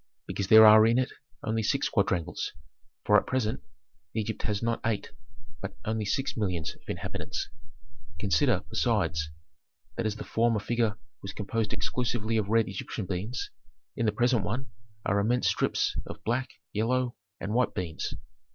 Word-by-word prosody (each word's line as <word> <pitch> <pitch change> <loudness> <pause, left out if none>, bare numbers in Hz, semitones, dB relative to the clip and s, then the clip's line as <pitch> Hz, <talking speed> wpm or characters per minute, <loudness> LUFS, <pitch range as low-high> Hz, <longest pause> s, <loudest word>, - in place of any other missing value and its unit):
Because 100 - -3
there 110 +2 +10
are 110 0 +9
in 115 +1 +4
it 130 0 +1 0.3
only 110 +1 0
six 105 - +1
quadrangles, 85 -3 0 0.5
for - - +7
at - - -11
present 125 -2 0 0.5
Egypt 110 -1 -2
has 105 0 -1
not 115 0 0
eight, 110 -2 -1 0.5
but 100 - -6
only 110 0 -1
six 135 +7 -1
millions 90 -7 -1
of - - -22
inhabitants. - - -4 0.7
Consider, 85 -4 +3
besides, 80 0 +1 0.7
that - - +1
as 105 - -2
the - - -6
former 115 -1 +2
figure 110 0 0 0.2
was 95 - -6
composed 110 +1 -2
exclusively 115 -2 -1
of 105 -2 0
red 115 0 +4
Egyptian 95 +2 -4
beans, 100 +7 -3 0.4
in 115 - 0
the - - +4
present 120 0 +2
one 125 +6 -3 0.3
are 100 +1 +2
immense 120 +5 +2
strips - - +1
of - - -8
black, 125 +3 0 0.2
yellow, 120 +3 +1 0.2
and 100 +2 -3
white 125 +1 +2
beans. 85 -4 -3
110 Hz, 155 wpm, -29 LUFS, 100-115 Hz, 0.7 s, there